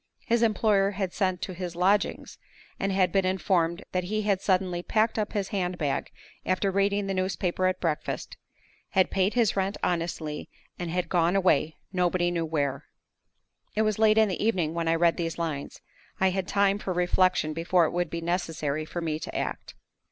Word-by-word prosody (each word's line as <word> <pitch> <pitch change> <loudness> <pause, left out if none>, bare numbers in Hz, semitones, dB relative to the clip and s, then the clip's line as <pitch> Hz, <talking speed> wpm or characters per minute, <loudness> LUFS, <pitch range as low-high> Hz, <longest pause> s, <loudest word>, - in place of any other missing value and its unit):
His 235 -1 +2
employer 210 -3 +3
had 190 -3 -2
sent 185 -3 0
to 185 - -4
his 175 -1 -5
lodgings, 195 +4 +1 0.4
and 195 - 0
had 190 -1 +2
been 195 -1 +2
informed 185 -2 +1
that 180 -1 -1
he 215 +3 -1
had 200 -2 +1
suddenly 185 -3 +1
packed 220 +4 +1
up 210 - -2
his 200 -3 -1
hand 180 -3 -2
bag 145 -5 -1 0.3
after 185 +1 0
reading 200 +1 +1
the 195 - -2
newspaper 185 -1 0
at 185 0 -1
breakfast; 160 -4 -3 0.6
had 190 -1 +3
paid 195 +3 +1
his 230 -5 +3
rent 195 +1 -1
honestly, 165 -3 -2 0.3
and 175 -1 -3
had 180 +1 -1
gone 175 0 +2
away, 160 -5 +2 0.2
nobody 175 -1 +1
knew 170 -1 -1
where! 145 -3 -2 0.9
It 215 - +3
was 215 -1 0
late 220 -1 +5
in 220 -1 +6
the 190 - -2
evening 180 -8 +1
when 170 -1 -2
I 165 - +3
read 170 0 +3
these 165 -2 -3
lines. 160 -4 -4 0.4
I 190 0 +3
had 190 0 -2
time 200 0 +2
for 190 - -3
reflection 180 -2 +2
before 170 +2 +2
it - - -1
would 175 -2 -1
be 170 +1 -4
necessary 165 -3 -2
for 175 +2 -5
me 155 -2 -2
to - - -5
act. - - -4
185 Hz, 190 wpm, -27 LUFS, 170-195 Hz, 0.9 s, in